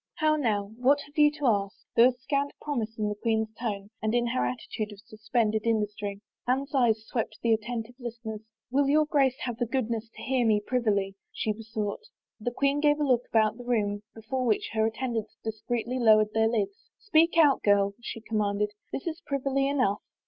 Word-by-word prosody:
" - - -62
How 310 0 +5
now? 210 -8 0
What 270 +4 +4
have 290 +1 -14
you 300 -2 +6
to 295 -1 -4
ask? 200 -4 +2
" - - -63
There 235 +2 +8
was 250 -1 -2
scant 280 +2 -1
promise 230 -7 -3
in 215 -1 0
the 210 - -1
queen's 220 0 -1
tone 210 -3 -4
and 215 +2 0
in 240 0 +2
her 235 - 0
attitude 170 - -4
of 205 - -11
suspended 220 0 -1
industry. 210 -2 -1 0.3
Anne's 270 +3 0
eyes 225 -5 +2
swept 220 -2 -3
the 230 -1 +4
attentive 225 +1 -3
listeners. 230 -3 -6 0.2
" - - -63
Will 275 +1 +3
your 305 +1 +4
Grace 275 -4 +2
have 245 -3 -3
the 240 -1 -1
goodness 230 -2 -2
to - - -9
hear 260 -1 +1
me 215 -2 +4
privily? 210 -4 0
" - - -53
she 215 - -1
be 225 +2 -10
soqght. 215 - -4 0.3
The 220 - -1
queen 275 +3 +1
gave 295 0 +3
a - - +1
look 250 -2 +2
about 220 0 +2
the - - -7
room 205 -4 0
before 240 +4 -3
which 225 -4 +1
her 220 0 +2
attendants 225 -1 -3
discreetly 235 +3 -3
lowered 215 -2 +5
their 220 0 +3
lids. 205 -3 -2
" - - -65
Speak 335 -2 +4
out, 295 -4 +5
girl," 200 -1 +3
she 230 -1 -6
commanded. 210 -2 0
" - - -45
This - - -4
is 335 0 -4
privily 275 0 0
enough." 255 -8 +1
230 Hz, 215 wpm, -28 LUFS, 215-260 Hz, 0.3 s, There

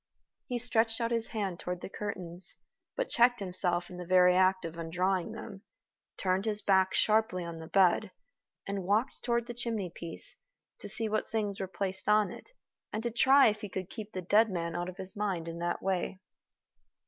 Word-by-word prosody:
He 245 - -2
stretched 225 -1 +2
out 230 0 -1
his 230 -1 +1
hand 195 -5 -3
toward 180 0 -4
the - - -5
curtains, 185 -3 -5 0.4
but - - -1
checked 240 +1 +4
himself 180 -2 0
in 180 - -10
the 180 - -5
very 180 0 +5
act 185 0 +3
of 165 0 -6
undrawing 180 +4 -1
them, 210 -3 -8 0.6
turned 190 +1 0
his 215 -1 0
back 190 -1 +3
sharply 215 -5 +2
on 170 -1 -6
the 160 - -8
bed, 190 +3 +3 0.6
and 200 -1 -3
walked 215 +8 0
toward 235 -1 0
the 240 - -6
chimney 225 -6 -3
piece, 175 - -6 0.4
to - - -6
see 225 - +4
what 215 0 -1
things 210 -3 -2
were 190 - -2
placed 190 +2 -3
on 210 -3 +4
it, - - -11 0.4
and 215 +1 -3
to 235 - -1
try 265 +3 +6
if 215 0 -4
he 210 - -5
could 185 0 -5
keep 215 -1 -7
the 185 - -4
dead 215 +5 +4
man 170 -3 -3
out 175 +1 -2
of 185 - -10
his 190 -1 -4
mind 195 -5 -2
in 165 0 -6
that 175 0 -2
way. 190 0 -1
195 Hz, 195 wpm, -31 LUFS, 180-220 Hz, 0.6 s, try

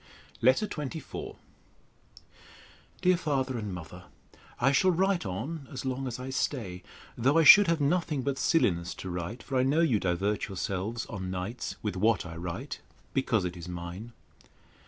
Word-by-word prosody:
LETTER 130 - +4
XXIV 150 -5 -6 1.7
DEAR 180 0 +5
FATHER 135 -6 -1
AND 105 -2 -4
MOTHER, 90 0 -8 0.5
I 135 +3 +4
shall 185 +7 +4
write 185 - +1
on, 135 - -4
as 135 -2 -6
long 130 +1 -2
as 125 0 -5
I 130 +1 -5
stay, 110 -10 -2 0.3
though 135 +7 +3
I 165 - +6
should 205 +5 +10
have 165 -1 +2
nothing 150 -2 +1
but 140 0 -1
silliness 90 - +2
to 95 - -6
write; 90 +7 -5
for 135 - -2
I - - +4
know 140 +5 +3
you 130 -11 +3
divert 95 +3 0
yourselves 100 +4 -3
on 95 -3 -5
nights 95 +7 -4
with 105 -2 -2
what 110 +3 +2
I 85 -1 -7
write, 90 - -5 0.3
because 115 -7 +1
it 90 0 -3
is 85 0 -8
mine. 90 +6 -7
120 Hz, 160 wpm, -29 LUFS, 95-140 Hz, 1.7 s, should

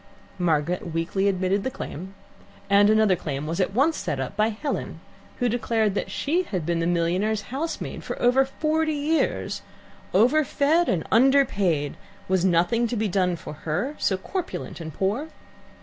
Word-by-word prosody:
Margaret 170 0 0
weakly 190 +4 0
admitted 190 +1 +1
the - - -1
claim, 190 - -7 0.6
and 205 +1 +6
another 215 -3 +4
claim 145 -4 -4
was 165 +3 -3
at 190 +1 0
once 300 +6 +3
set 135 - -3
up 130 +7 -4
by 215 +1 +3
Helen, 230 +7 -4 0.4
who 245 - +1
declared 225 -3 +1
that 205 - -2
she 330 +6 0
had 185 - -4
been 170 0 0
the 165 - 0
millionaire's 180 +5 +1
housemaid 320 +4 -4
for - - -5
over 250 +2 +4
forty 310 +3 0
years, 300 +3 0 0.5
overfed 290 - +3
and 165 -4 0
underpaid; 205 - +3 0.3
was 185 -1 +1
nothing 190 +7 +2
to 240 - -3
be 220 -1 0
done 180 -2 +1
for 160 - -8
her, 165 - -2
so 190 - +1
corpulent 355 - -5
and 160 -1 -6
poor? 210 - -1
200 Hz, 160 wpm, -25 LUFS, 175-265 Hz, 0.6 s, and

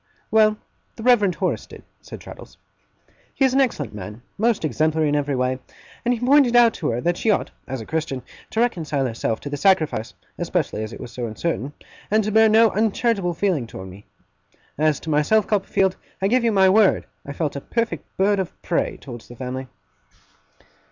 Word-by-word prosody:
'Well, 215 -1 +4 0.4
the 225 - -9
Reverend 210 -7 +4
Horace - - -2
did,' - - -13 0.2
said - - -10
Traddles. - - -12 0.8
'He 270 - +3
is 260 - +2
an 275 - +4
excellent 150 - -1
man, 105 +3 -8
most 225 -5 +1
exemplary 155 +3 +1
in 145 - +1
every 145 -1 0
way; 125 0 0 0.4
and 240 - +1
he 245 - 0
pointed 255 0 +4
out 235 -2 +6
to 155 - -2
her 120 +1 -1
that 175 +3 0
she 225 - 0
ought, 205 - +1 0.2
as 130 -3 -4
a - - -8
Christian, 155 -4 -3 0.3
to 225 - 0
reconcile 155 - 0
herself 115 -2 -2
to 145 - -6
the 145 - -2
sacrifice 155 - +1 0.2
(especially 110 - -1
as 110 - -6
it - - -9
was 120 - -8
so 120 -1 -4
uncertain), 145 +4 -3 0.4
and 215 +1 +3
to 215 - -2
bear 220 +1 +6
no 220 0 +5
uncharitable 210 -3 0
feeling 165 - 0
towards 95 -3 -9
me. 100 +3 -14 0.7
As 155 0 +1
to 160 - -4
myself, 155 +9 +3
Copperfield, 195 -2 +1 0.2
I 195 - +1
give 245 +3 +2
you 230 - +3
my 190 -2 +5
word, 200 +1 +4 0.2
I 140 - -7
felt 150 -1 -2
a 140 - -4
perfect 230 - -2
bird 200 +1 +3
of 190 - -4
prey 170 - -1
towards 120 -4 -10
the 120 - -11
family. 130 +2 -5
170 Hz, 195 wpm, -22 LUFS, 130-220 Hz, 0.8 s, out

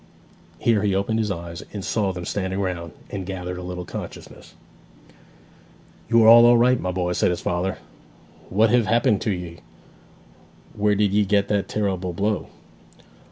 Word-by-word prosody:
Here 110 +2 +2
he 100 -2 +1
opened 105 +3 0
his 110 -2 0
eyes, 85 -2 -6
and 100 -3 -5
saw 100 -4 0
them 90 -1 -7
standing 95 0 -3
round, 90 -4 -3 0.2
and 100 -2 -4
gathered 90 -1 -5
a - - -7
little 90 0 -6
consciousness. - - -9 1.5
'You 115 -1 +5
are - - +6
all 120 +1 +8
right, 125 +1 +3
my 90 - -3
boy!' 90 -1 -2
said 90 - +1
his 90 - -2
father. 90 +2 -2 0.7
'What 110 +3 +3
hev 120 -3 +3
happened 115 -3 +2
to 110 - -1
ye? 85 -3 -6 1.1
Where 105 0 +1
did 100 -1 +1
ye 105 0 +3
get 100 0 +1
that 100 -2 0
terrible 95 -4 -2
blow?' 100 +2 -1
100 Hz, 160 wpm, -23 LUFS, 90-105 Hz, 1.5 s, all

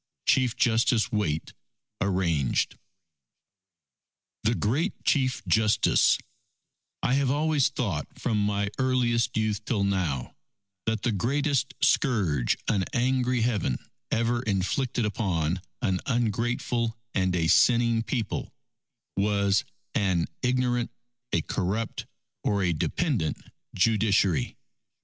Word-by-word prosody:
Chief 125 -3 +3
Justice 115 -1 +2
Waite 85 -8 -1 0.5
(Arranged) 85 -8 +1 1.7
THE 115 +2 +1
GREAT 145 - 0
CHIEF 130 -6 +1
JUSTICE 105 +4 +3 0.9
_I 125 - +2
have 135 -1 +2
always 150 0 +2
thought 100 - -2
from 110 -4 0
my 100 -1 0
earliest 125 -4 +1
youth 110 -1 0
till 105 -3 0
now, 90 -10 -1 0.5
that 110 -1 0
the 120 - +1
greatest 135 +6 0
scourge 95 - +2
an 100 -4 +2
angry 125 0 +1
Heaven 105 - 0 0.3
ever 115 +1 +1
inflicted 115 +4 0
upon 90 -5 -1 0.2
an 95 -5 +1
ungrateful 120 0 0 0.2
and 95 -2 +1
a 85 -2 +1
sinning 115 +5 +4
People, 115 -2 -3 0.6
was 100 0 +2 0.3
an 95 -5 +1 0.2
ignorant, 125 -1 +1 0.4
a - - +2
corrupt, 105 +4 -2 0.4
or 100 -1 +1
a 90 -2 +2
dependent 105 - -1 0.4
Judiciary. 100 -4 +2
110 Hz, 105 wpm, -27 LUFS, 95-125 Hz, 1.7 s, sinning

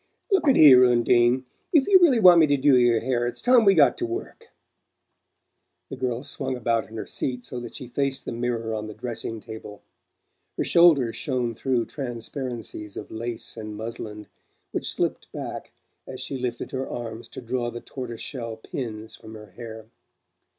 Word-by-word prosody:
"Look 380 -5 +3
at 270 - +6
here, 130 -4 +9
Undine, 120 +1 +3 0.3
if 300 -6 +4
you 385 -2 +7
really 300 -10 +5
want 180 -4 +8
me 160 - +6
to 145 -1 +2
do 140 0 +4
your 120 -2 +4
hair 120 -1 0
it's 120 - -4
time 250 -2 +5
we 195 -1 +6
got 150 -4 +4
to 355 - -1
work." 400 +6 -7 1.4
The - - -4
girl 125 -1 -2
swung 130 -2 -3
about 115 -2 0
in 110 - -9
her - - -4
seat 125 -2 -4
so 125 - -5
that 120 -1 -9
she 130 - -7
faced 135 +2 -2
the - - -4
mirror 115 -1 -2
on 110 0 -4
the 110 - -9
dressing 115 -1 -5
table. 110 -2 -10 0.7
Her - - +1
shoulders 155 -9 +4
shone 125 -4 -1
through 120 0 0
transparencies 120 -4 -6
of - - -8
lace 115 +1 -5
and 110 -2 -7
muslin 105 -1 -6 0.5
which - - -2
slipped - - -2
back - - -6 0.4
as - - -7
she 140 - -4
lifted 125 -2 -4
her 130 0 -3
arms 115 -1 -6
to - - -9
draw 120 0 -2
the 120 - -7
tortoise 120 -2 -7
shell 115 -5 -6
pins 110 -2 -6
from 110 0 -12
her 105 -1 -12
hair. 110 -2 -9
120 Hz, 180 wpm, -25 LUFS, 115-135 Hz, 1.4 s, here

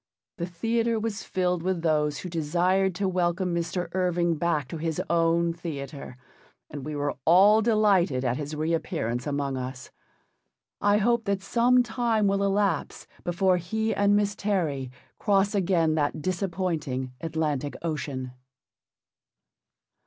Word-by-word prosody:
The 170 - -2
theatre 225 +6 0
was 215 -1 -3
filled 180 -2 -1
with 180 -1 -1
those 150 -3 +1
who 125 - -6
desired 180 +4 +1
to 195 +1 0
welcome 180 0 0
Mr. 175 +1 -2
Irving 175 -2 +1
back 155 -4 0
to 165 - -5
his 160 0 -2
own 170 0 +2
theatre, 145 -6 -7 0.5
and 145 -2 -6
we 150 +2 -5
were 145 0 -1
all 200 +7 +6
delighted 200 - +2
at 120 -1 +1
his 150 +1 -5
re 155 +2 -1
appearance 120 -6 -2
among 140 -2 -1
us. 130 0 -6 0.9
I 205 0 +4
hope 235 +2 +2
that 200 -1 -1
some 245 +4 +3
time 230 -2 0
will 195 0 +2
elapse 200 0 0 0.2
before 180 +1 +2
he 220 +6 -1
and 205 0 +3
Miss 205 0 +1
Terry 165 -12 -1 0.3
cross 200 -1 +2
again 175 -5 +2
that 155 0 0
disappointing 165 -7 -2
Atlantic 155 -4 -2
Ocean. 140 -5 -3
175 Hz, 140 wpm, -26 LUFS, 150-200 Hz, 0.9 s, all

